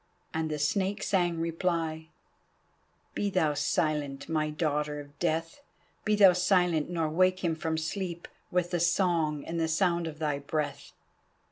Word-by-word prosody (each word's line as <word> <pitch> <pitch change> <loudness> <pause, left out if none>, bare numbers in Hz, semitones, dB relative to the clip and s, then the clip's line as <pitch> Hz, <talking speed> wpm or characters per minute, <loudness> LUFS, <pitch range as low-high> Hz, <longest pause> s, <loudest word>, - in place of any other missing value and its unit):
And 160 0 -1
the 150 - -2
Snake 195 +7 0
sang 175 -3 +1
reply: 165 -1 -1 1.0
"Be 205 - -1
thou 165 -6 +2
silent, 145 -1 -1
my 155 -1 0
Daughter 150 -1 -1
of 145 0 -12
Death, 165 - -1 0.4
be 215 -1 +3
thou 195 -3 +7
silent 180 -4 +2
nor 165 -3 0
wake 185 +4 +2
him 170 -2 +2
from 160 0 -2
sleep, 170 +1 -4 0.2
With 180 -1 0
the 175 - 0
song 165 -4 +1
and 170 0 -3
the 165 - +1
sound 170 +1 +1
of 155 -2 -7
thy 150 -2 -1
breath." 145 0 -3
165 Hz, 150 wpm, -29 LUFS, 155-180 Hz, 1.0 s, thou